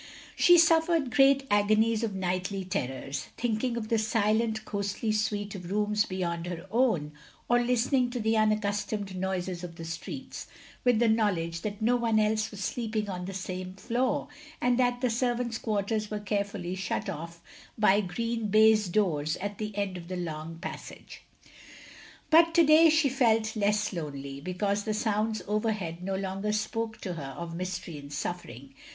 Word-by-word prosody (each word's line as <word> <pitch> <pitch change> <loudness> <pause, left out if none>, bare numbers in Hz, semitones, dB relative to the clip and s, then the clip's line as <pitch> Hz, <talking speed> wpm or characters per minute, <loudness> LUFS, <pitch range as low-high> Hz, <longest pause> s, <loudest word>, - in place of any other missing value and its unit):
She 350 0 +7
suffered 325 -4 +4
great 275 0 +5
agonies 215 +2 +3
of 215 -4 -2
nightly 185 +1 -2
terrors; 135 -2 -3
thinking 235 +1 -1
of 220 -2 -4
the 225 - +2
silent 220 0 +1
ghostly 200 +2 -2
suite 210 -1 -1
of 180 -2 -7
rooms 210 +1 +1
beyond 175 -2 -3
her 175 0 -5
own, 220 - +2 0.4
or 240 0 +4
listening 250 +1 +2
to 245 0 -4
the 220 0 +1
unaccustomed 210 -2 0
noises 185 -1 -3
of 170 -2 -7
the 165 - -8
streets; 165 - -6 0.4
with 245 -3 +4
the 235 +1 +3
knowledge 180 -7 +1
that 210 +2 -4
no 245 +2 +3
one 230 -2 +2
else 215 0 +1
was 205 -2 -9
sleeping 220 -1 -2
on 180 -1 -5
the 195 - -5
same 185 0 -5
floor, 240 +3 -1 0.3
and 245 0 +2
that 245 -1 +2
the 250 - +2
servants* 240 -1 -1
quarters 210 0 -1
were 210 - -3
carefully 200 -3 -2
shut 190 +2 -3
off 170 -1 -6 0.4
by 210 -1 +4
green 230 +4 -2
baize 215 0 +5
doors 155 -6 +1
at 205 +1 -5
the 210 -1 -4
end 195 -3 -1
of 170 -1 -9
the 185 0 -4
long 165 -1 -5
passage. 180 - -9 1.1
But 330 +1 +6
to 340 - +7
day 315 +2 +7
she 315 -1 +4
felt 225 -4 +2
less 210 0 +1
lonely, 140 -4 -6
because 200 +4 -1
the 215 0 -2
sounds 215 0 0
overhead 210 -5 -1
no 190 +1 -2
longer 195 +2 -2
spoke 220 +1 -2
to 185 - -4
her 140 -5 -7
of 170 -1 -6
mystery 180 -3 -5
and 140 0 -11
suffering. 140 -4 -5
210 Hz, 165 wpm, -28 LUFS, 185-225 Hz, 1.1 s, She